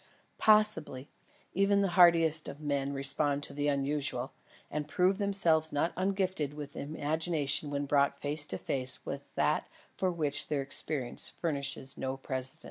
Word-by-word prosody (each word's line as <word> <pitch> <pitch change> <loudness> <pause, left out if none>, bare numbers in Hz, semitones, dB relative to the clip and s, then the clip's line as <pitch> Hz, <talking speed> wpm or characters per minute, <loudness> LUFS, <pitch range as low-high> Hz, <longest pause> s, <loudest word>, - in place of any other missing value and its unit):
Possibly; 210 -11 +2 0.4
even 200 +1 +2
the 195 - +1
hardiest 165 -3 +4
of 140 - -9
men 140 -2 -2
respond 140 +1 +1
to - - -5
the 145 0 -2
unusual, 140 -2 -1 0.4
and 150 0 -3
prove 185 +5 +1
themselves 170 -6 +2
not 145 +4 0
ungifted 185 -6 -1
with 145 -1 -8
imagination 155 0 -1
when 145 0 -2
brought 140 0 +1
face 150 +1 +1
to - - -3
face 130 -1 -2
with - - -6
that - - +1 0.3
for 185 - 0
which 150 -4 0
their 145 -2 -1
experience 135 -2 0
furnishes 140 -4 -3
no 130 0 -3
precedent. 130 +3 +1
150 Hz, 145 wpm, -30 LUFS, 140-170 Hz, 0.4 s, hardiest